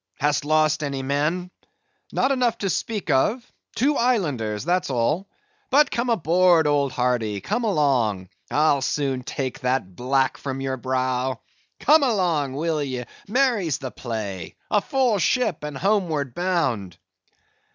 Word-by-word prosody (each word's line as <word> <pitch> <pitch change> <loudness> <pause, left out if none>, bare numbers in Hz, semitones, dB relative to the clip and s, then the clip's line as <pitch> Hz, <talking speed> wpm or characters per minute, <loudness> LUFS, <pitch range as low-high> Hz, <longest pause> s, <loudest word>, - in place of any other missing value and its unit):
Hast 145 0 0
lost 155 0 +2
any 140 -2 -3
men?" 155 +7 -1 0.6
"Not 265 - +1
enough 250 -4 +1
to 195 -2 -1
speak 210 -2 -2
of—two 245 - 0
islanders, 145 - 0
that's 180 0 +1
all;—but 270 - 0
come 235 +1 -1
aboard, 175 -4 +4
old 145 -2 +2
hearty, 125 -5 0
come 225 - -2
along. 125 - +1 0.2
I'll 145 -2 +3
soon 135 -1 -1
take 130 +1 -4
that 125 -8 -1
black 130 +3 +1
from 135 -1 -4
your 135 -1 -2
brow. 130 -1 -1 0.4
Come 310 +2 +5
along, 175 - +1
will 155 +1 -1
ye 130 -3 -3 0.2
(merry's 220 - +1
the 130 -3 -6
play); 105 -7 -5 0.2
a 210 - +3
full 250 -5 +1
ship 225 - +1
and 150 -2 -5
homeward 165 - 0
bound." 130 - -1
150 Hz, 130 wpm, -23 LUFS, 130-200 Hz, 0.6 s, Come